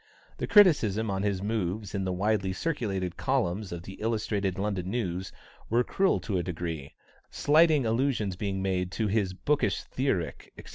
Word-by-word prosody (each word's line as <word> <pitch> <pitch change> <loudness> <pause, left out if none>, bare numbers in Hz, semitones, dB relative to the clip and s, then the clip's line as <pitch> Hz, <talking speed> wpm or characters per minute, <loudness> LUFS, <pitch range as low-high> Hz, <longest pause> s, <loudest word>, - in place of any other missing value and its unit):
The - - -3
criticisms 115 - +5
on 95 0 -1
his 100 -2 -1
moves 105 -1 -2
in 95 -2 -1
the 95 - -1
widely 95 0 0
circulated 95 - -2
columns 105 -7 -1
of 85 -1 -6
the 95 +3 -10
Illustrated 105 -4 -1
London 95 -2 -2
News 95 -5 -2 0.4
were 120 +2 +3
cruel 190 +9 +1
to 95 -4 -1
a - - -1
degree; 80 -5 -5 0.3
slighting 155 -2 +4
allusions 115 -4 0
being 95 0 -2
made 90 -1 -1
to 110 - -1
his 100 -3 0
"bookish 150 +8 0
theoric," 100 - -2
etc. - - -11
100 Hz, 160 wpm, -28 LUFS, 95-115 Hz, 0.4 s, criticisms